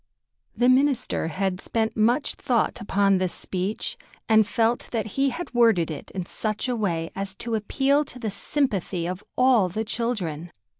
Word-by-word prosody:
The 245 +2 +3
minister 260 - +2
had 185 +2 -2
spent 225 -1 -1
much 235 +6 +2
thought 245 -5 0
upon 200 -1 +2
this 185 -1 0
speech, 190 +3 -3 0.3
and 220 -2 +5
felt 230 +1 0
that 225 -3 -1
he 275 0 +2
had 330 +3 -6
worded 225 -9 +4
it 150 - -7
in 185 -2 -5
such 215 +5 -2
a 250 - 0
way 170 -7 -1
as 195 0 -4
to 230 +4 -4
appeal 270 +7 +2
to 255 - -11
the 225 -4 -3
sympathy 195 - -1
of 185 +3 -5
all 250 -7 +4
the 220 +5 -3
children. 190 -9 -3
220 Hz, 165 wpm, -25 LUFS, 185-245 Hz, 0.3 s, and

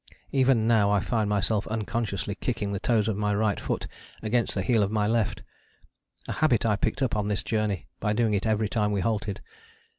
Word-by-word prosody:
Even 130 -4 +3
now 110 -3 +4
I 105 0 +3
find 105 +2 0
myself 105 +1 +1
unconsciously 110 -2 -2
kicking 105 -1 -3
the 100 - -2
toes 110 -1 +2
of 110 - 0
my 105 0 0
right 105 -1 +1
foot - - -2 0.4
against 115 +2 0
the 95 - 0
heel 110 +2 +3
of 100 - +1
my 105 -1 +1
left: 115 -1 0 0.8
a - - -3
habit 125 -8 +2
I 105 -2 +3
picked 105 - -1
up 130 - 0
on 105 -1 0
this 105 -1 -1
journey 105 -4 -1
by 105 - 0
doing 110 -1 +1
it 100 +2 0
every 110 0 +1
time 105 -1 0
we 100 -2 0
halted. 105 -1 -2
105 Hz, 205 wpm, -27 LUFS, 100-115 Hz, 0.8 s, now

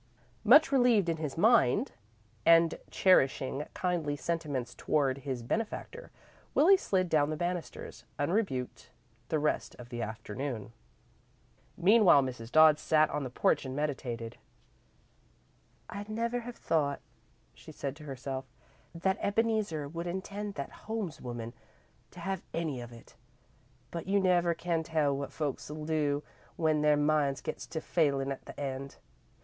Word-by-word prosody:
Much 270 +6 +7
relieved 245 -9 +4
in 165 - 0
his 155 -3 -4
mind 215 - +4 0.5
and 165 +2 +5
cherishing 135 -6 +3
kindly 170 -5 -1
sentiments 145 -6 -3
toward 140 -3 0
his 130 -4 -4
benefactor, 225 - -4 0.5
Willie 360 +7 +7
slid 190 - 0
down 150 -3 +2
the 155 - -2
banisters, 175 -4 -4
unrebuked, 145 - -1 0.4
the 160 - +1
rest 150 0 -1
of 120 -1 -11
the 120 -1 -5
afternoon. 110 +1 -5 1.0
Meanwhile 185 -5 +6
Mrs. 125 -3 -6
Dodd 155 -1 +7
sat 155 -1 +3
on 150 - -2
the 130 - -4
porch 125 - +1
and 130 -1 -5
meditated. 125 -6 -3 1.5
"I'd 205 +1 -7
never 230 +2 -1
have 240 0 -8
thought," 145 -4 0 0.5
she - - -13
said 140 -1 -5
to 150 - -11
herself, 135 -1 -5 0.5
"that 190 +3 0
Ebeneezer 205 -8 0
would 170 +4 -5
intend 200 +3 -4
that 140 - -5
Holmes 215 -9 -5
woman 120 -2 -6 0.6
to - - -13
have 195 -2 -2
any 155 -7 -2
of 120 0 -9
it, 115 -1 -15 0.8
but 170 +1 -5
you 200 +1 +3
never 175 -3 +3
can 170 -1 -1
tell 155 -3 +1
what 140 0 -4
folks'll 150 +1 -4
do 150 -2 0 0.3
when 155 -2 +1
their 150 -1 +4
minds 145 -2 +2
gets - - -6
to 160 - -4
failin' 140 -5 +1
at 135 - -6
the - - -10
end. 135 -1 -4
155 Hz, 140 wpm, -31 LUFS, 135-185 Hz, 1.5 s, Much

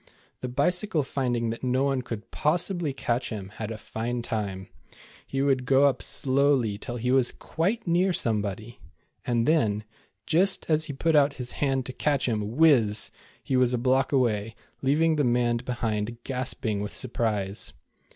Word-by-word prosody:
The 125 - -4
Bicycle 160 - 0
finding 120 -4 -1
that 115 - -7
no 130 +1 +1
one 135 -2 +1
could 115 -3 -7
possibly 170 0 0
catch 125 -2 -2
him, 100 -4 -6
had 110 -1 -4
a 110 - -5
fine 115 +3 -4
time. 100 -5 -3 0.6
He 135 0 -1
would 135 -2 +2
go 135 +2 +4
up 140 -3 +3
slowly 130 -6 +2
till 120 0 -5
he 125 +1 -1
was 130 -2 +3
quite 195 +9 -2
near 180 +2 +2
some 115 -10 +1
body, 110 +4 -6 0.5
and 120 -1 +1
then, 110 -10 +2 0.4
just 190 +5 +2
as 155 -1 +2
he 145 - -5
put 160 +4 +1
out 145 -1 +4
his 125 -3 -5
hand 135 -2 -1
to 130 - -6
catch 145 -2 0
him, 110 -3 0 0.2
whizz, 120 -10 +5 0.3
he 130 - -1
was 125 -1 +3
a - - 0
block 130 +2 +2
away, 115 -5 +1 0.3
leaving 155 +4 +2
the 145 - +2
man 120 -1 +2
behind 115 -2 -3
gasping 125 -5 -2
with 105 - -5
surprise. 105 -5 -2
125 Hz, 170 wpm, -26 LUFS, 115-140 Hz, 0.6 s, whizz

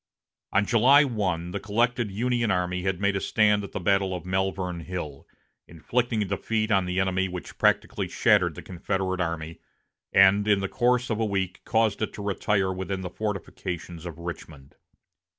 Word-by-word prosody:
On 100 +2 +2
July 125 +7 +6
1, 95 - -2
the 100 - -3
collected 115 +3 0
Union 120 +3 0
army 90 -1 0
made 100 +2 0
a - - +1
stand 105 -1 +2
at 100 - -8
the - - -4
battle 95 0 +1
of 90 - -7
Malvern 95 -1 -1
Hill, 80 -5 -6 0.4
inflicting 115 +6 -1
a - - -3
defeat 110 +3 -1
on 95 -2 +3
the 90 +1 -1
enemy 95 0 +1
which 90 -1 -8
practically - - +1
shattered - - +3
the - - -9
Confederate 95 +1 -2
army, 85 -1 -4 0.5
and 95 +2 +5
in 100 -2 +4
the 95 - -2
course 125 +2 +1
of 110 - -1
a - - +1
week 95 -3 -2
caused 110 -2 +1
it 110 - -2
to 105 - -7
retire 100 -1 0
within 95 +1 -4
the 90 -1 -6
fortifications 90 -4 -5
of 85 -2 -8
Richmond. 80 -5 -8
95 Hz, 170 wpm, -26 LUFS, 90-105 Hz, 0.5 s, July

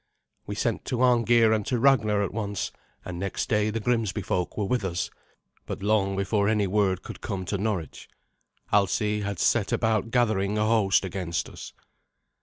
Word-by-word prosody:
We - - -4
sent - - -1
to 125 0 0
Arngeir 120 -2 +4
and 110 -1 0
to 125 - +1
Ragnar 110 -5 +3
at 100 - -3
once, 105 -2 -3 0.3
and 85 -1 -6
next 100 +1 -3
day 105 0 +2
the 110 +1 -2
Grimsby 110 -3 0
folk 90 0 -2
were 105 - 0
with 120 +2 0
us, 90 -2 -2 0.6
but - - -5
long 100 -2 +2
before 100 +1 +1
any 105 -2 +2
word 95 -2 +1
could - - -9
come 95 -2 -4
to 100 +2 -2
Norwich, 100 -6 -3 0.6
Alsi 105 +1 +2
had 100 -1 -3
set 105 +4 +2
about 110 -1 +1
gathering 110 -4 +1
a 105 - +2
host 110 -4 +3
against 90 -3 -3
us. - - -10
105 Hz, 175 wpm, -26 LUFS, 95-110 Hz, 0.6 s, Arngeir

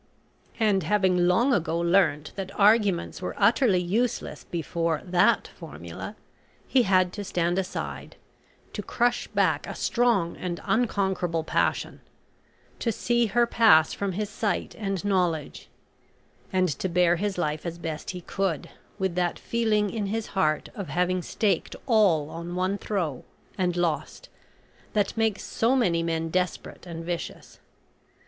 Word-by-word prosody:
And 210 -4 +3
having 180 0 +2
long 235 +9 +3
ago 165 -5 0
learnt 170 -4 +2
that 195 0 -6
arguments 205 -4 +3
were 180 - -4
utterly 215 0 +4
useless 215 +7 -1
before 165 -1 -2
that 180 -1 +3
formula, - - -9 0.5
he 260 - +4
had 185 -4 +3
to 205 - -5
stand 175 -1 0
aside 190 0 -5 0.6
to - - -3
crush 240 0 0
back - - +1
a - - -6
strong 230 -8 +1
and 175 -2 -4
unconquerable 190 -8 0
passion - - -1 0.8
to 230 - 0
see 235 +1 +1
her 240 +3 +3
pass 220 -9 +5
from 200 -2 -2
his 210 +2 -3
sight 205 -3 -2
and 195 -3 -3
knowledge 175 -6 -1 0.8
and 185 -1 +2
to 190 - -1
bear 175 0 +3
his 200 +1 -2
life 155 -3 -1
as 170 -1 -5
best 160 -3 -5
he 180 -1 -5
could, 185 -3 -2 0.3
with 190 -3 -1
that 175 -1 0
feeling 215 -3 0
in 215 -3 -2
his 220 +2 -2
heart 155 -6 +1
of 200 -6 -6
having 180 +1 +1
staked 205 +3 -1
all 190 - +3
on 170 +1 -6
one 185 +2 0
throw, 170 -11 -2 0.3
and 180 -2 0
lost, 175 - -2 0.6
that 205 -2 +1
makes 220 -2 0
so 235 +4 +1
many 180 -10 +2
men 165 -1 -1
desperate 180 0 -2
and 165 -1 -6
vicious. 175 -1 -6
185 Hz, 140 wpm, -26 LUFS, 170-210 Hz, 0.8 s, pass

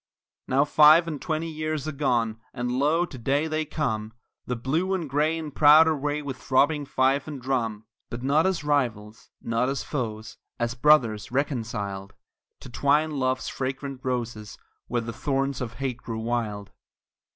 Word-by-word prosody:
Now 135 +2 +3
five 155 +3 +6
and 150 -4 -5
twenty 160 0 -2
years 155 -1 -3
are - - -1
gone, 120 -6 0 0.2
and 125 0 -2
lo, 150 +7 +2
to 140 - -10
day 140 +6 +1
they 155 0 -1
come, 110 -8 -3 0.3
The 125 - -1
Blue 160 +11 0
and 170 -4 -3
Gray 150 +4 +1
in 155 -2 -6
proud 150 +3 +7
array 150 -1 -1
with 135 -2 -5
throbbing 145 +3 +2
fife 135 +2 +1
and 145 -3 -6
drum; 115 -4 -2 0.2
But 120 +1 -6
not 150 +6 +3
as 190 -5 -1
rivals, 115 -8 -1
not 115 +2 0
as 140 - -2
foes, 110 -6 -5 0.2
as 120 0 -1
brothers 120 -6 +3
reconciled, 110 -8 -3 0.5
To - - -10
twine 145 +5 +2
love's 130 -2 -1
fragrant 135 0 -4
roses 120 -5 -4 0.3
where 120 -1 -1
the 115 0 -6
thorns 135 +2 -1
of 115 -3 -4
hate 130 -3 -3
grew 115 -2 -6
wild. 110 -4 -3
135 Hz, 160 wpm, -26 LUFS, 120-150 Hz, 0.5 s, proud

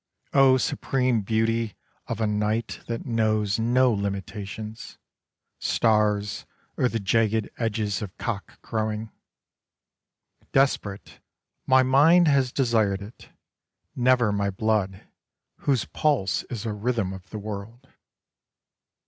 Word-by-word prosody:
O 135 -2 +6
supreme 125 -2 0
beauty 115 +1 0 0.3
of 115 - -4
a 110 - +1
night 105 +2 -1
that 115 -1 -4
knows 110 -3 +1
no 125 +2 +3
limitations 100 +2 -5 0.3
— - - -64 0.2
stars 105 -2 +1 0.3
or 125 - +2
the 115 - -2
jagged 110 +1 +1
edges 105 -4 -1
of 100 -4 -7
cock 105 -4 -5
crowing. 110 -1 -3 1.4
Desperate, 120 -7 0 0.5
my 130 0 +6
mind 155 +7 +5
has 135 -4 +3
desired 110 -7 +1
it: 105 +4 -13 0.7
never 125 -3 +3
my 100 -1 0
blood, 100 -1 -1 0.6
whose 135 -5 +2
pulse 140 - 0
is 115 -2 -5
a 110 - -2
rhythm 105 -2 -1
of 95 -1 -11
the 110 - -6
world. 105 +5 -7
110 Hz, 115 wpm, -25 LUFS, 105-125 Hz, 1.4 s, O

